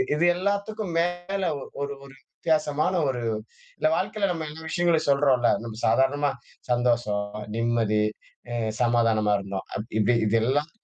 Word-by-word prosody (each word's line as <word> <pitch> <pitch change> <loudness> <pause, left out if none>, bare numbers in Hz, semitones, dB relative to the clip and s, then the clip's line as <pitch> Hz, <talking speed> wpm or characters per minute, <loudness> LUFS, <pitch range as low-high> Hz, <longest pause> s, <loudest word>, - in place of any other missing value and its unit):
இது 170 +3 +2
எல்லாத்துக்கும் 200 +1 -2
மேல 175 +3 -1 0.4
ஒரு 140 0 -2
ஒரு 135 - -13 0.4
வித்தியாசமான, 155 +2 +2 0.2
ஒரு 125 -2 -2 0.6
இல்ல 155 - +2
வாழ்க்கைல 200 +1 0
நாம 160 -3 -3
இந்த 160 +1 -10
விஷயங்கள 175 -2 +2
சொல்கிறோம்ல. 135 -4 +4
நம்ம 115 -1 -7
சாதாரணமா 140 +2 +3 0.4
சந்தோஷம், 120 -4 +1 0.3
நிம்மதி, 115 -2 +2 0.5
அ - - -2 0.3
சமாதானமா 115 -3 +3
இருந்தோம். 95 -1 -5
அப் 105 +3 -6
இப்டி 120 +3 +3
இது 115 +2 +3
எல்லாம் 145 +6 +1
140 Hz, 135 wpm, -26 LUFS, 115-170 Hz, 0.6 s, சொல்கிறோம்ல